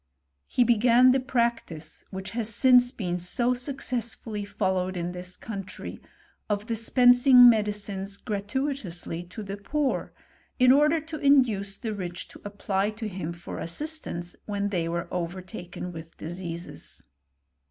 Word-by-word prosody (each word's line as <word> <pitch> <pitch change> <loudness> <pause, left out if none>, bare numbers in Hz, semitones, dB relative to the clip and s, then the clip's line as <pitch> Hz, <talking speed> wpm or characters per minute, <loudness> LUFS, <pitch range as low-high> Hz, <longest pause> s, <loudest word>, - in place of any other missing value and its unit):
He 250 - +3
began 240 +2 +5
the 265 - +3
practice, 235 -11 -2
which 190 0 -6
has 230 -2 -2
since 245 +2 +5
been 180 -8 -3
so 240 +8 +1
successfully 245 -5 -4
followed 190 -2 -1
in 175 0 -2
this 180 0 -7
country, 200 -4 -7 0.5
of 205 0 -1
dis 230 -1 -4
pensing 245 0 +8
medicines 205 -3 0
gratuitously 205 - -3
to 185 +5 -8
the 200 0 -5
poor, 275 +7 -1 0.5
in 255 -1 +6
order 300 +4 +5
to 315 0 -7
induce 230 -9 +3
the 225 -3 -4
rich 180 -3 -5
to - - -13
apply 200 -1 -1
to 220 +1 -5
him 180 -5 -4
for 170 0 -7
assistance 175 - -4
when 205 -1 -1
they 170 -4 -1
were 170 0 -2
overtaken 180 +1 -5
with 165 -1 -10
diseases. 170 0 -7
205 Hz, 135 wpm, -27 LUFS, 180-245 Hz, 0.5 s, pensing